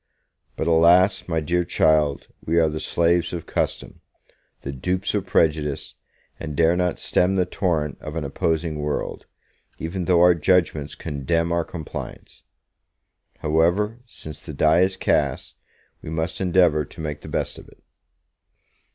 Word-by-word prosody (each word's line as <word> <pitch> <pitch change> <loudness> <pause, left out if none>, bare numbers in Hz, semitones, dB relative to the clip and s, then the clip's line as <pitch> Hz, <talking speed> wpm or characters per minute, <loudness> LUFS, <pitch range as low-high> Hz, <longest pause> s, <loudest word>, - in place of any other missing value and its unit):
But - - -2
alas, 85 +4 +4
my 80 -2 0
dear 85 +3 0
child, 75 -4 +2 0.2
we 85 +2 0
are 80 -1 +3
the 75 0 -4
slaves 85 +2 +1
of 85 -2 -5
custom, - - -3 0.6
the 70 - -5
dupes 90 +8 -2
of 100 -2 -2
prejudice, 75 -4 0 0.5
and 75 -3 -6
dare 85 +2 +3
not 90 -1 0
stem 90 +2 +1
the 90 -1 +2
torrent 80 -8 -2
of 75 +1 -7
an 80 - -2
opposing 80 +2 -1
world, 75 0 -3 0.5
even 85 +2 -4
though 90 -2 +4
our 90 0 +7
judgements 80 -4 +1
condemn 85 +3 -1
our 85 0 +1
compliance! 80 -2 -8 1.0
However, 85 +9 +1
since 75 -8 -10
the 75 -1 -9
die 80 +4 +4
is 95 +1 +1
cast, - - 0 0.4
we - - -8
must 80 +2 -3
endeavor 90 -4 +3
to 70 - -14
make 75 -2 -5
the - - -11
best - - -3
of - - -15
it. - - -21
80 Hz, 150 wpm, -23 LUFS, 75-90 Hz, 1.0 s, our